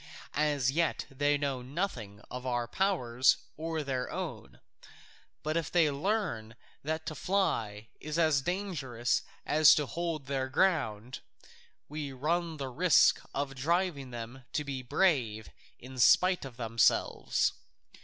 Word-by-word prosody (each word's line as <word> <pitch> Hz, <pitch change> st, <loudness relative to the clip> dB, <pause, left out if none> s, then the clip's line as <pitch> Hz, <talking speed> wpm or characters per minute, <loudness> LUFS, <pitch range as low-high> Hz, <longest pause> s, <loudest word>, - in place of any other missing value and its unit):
As 145 Hz, -4 st, +1 dB
yet 165 Hz, +2 st, 0 dB
they 145 Hz, +2 st, +1 dB
know 140 Hz, -3 st, -2 dB
nothing 125 Hz, -, -4 dB
of 125 Hz, 0 st, -5 dB
our 120 Hz, -2 st, -1 dB
powers 130 Hz, -11 st, +2 dB, 0.2 s
or 160 Hz, 0 st, -3 dB
their 130 Hz, -2 st, -2 dB
own, -, -, -6 dB, 0.8 s
but 155 Hz, +1 st, -1 dB
if 165 Hz, -3 st, -1 dB
they 165 Hz, -4 st, +4 dB
learn 140 Hz, -, -2 dB, 0.3 s
that 160 Hz, +2 st, -3 dB
to -, -, -4 dB
fly 115 Hz, -, -1 dB
is 155 Hz, +1 st, -4 dB
as 155 Hz, -4 st, +3 dB
dangerous 135 Hz, -, -1 dB, 0.2 s
as 155 Hz, 0 st, +6 dB
to 150 Hz, -, 0 dB
hold 160 Hz, +2 st, -3 dB
their 135 Hz, -1 st, -2 dB
ground, 130 Hz, -, 0 dB, 0.7 s
we 150 Hz, -1 st, -5 dB
run 160 Hz, +5 st, -1 dB
the 135 Hz, -2 st, -4 dB
risk 155 Hz, +1 st, +4 dB
of 140 Hz, 0 st, -2 dB
driving 155 Hz, 0 st, -1 dB
them 120 Hz, +2 st, -8 dB
to 150 Hz, -, 0 dB
be 140 Hz, -2 st, -4 dB
brave 120 Hz, -, +1 dB, 0.3 s
in 130 Hz, +1 st, -10 dB
spite 180 Hz, +7 st, +5 dB
of 125 Hz, -3 st, -10 dB
themselves. 115 Hz, -1 st, +1 dB
140 Hz, 135 wpm, -30 LUFS, 125-165 Hz, 0.8 s, as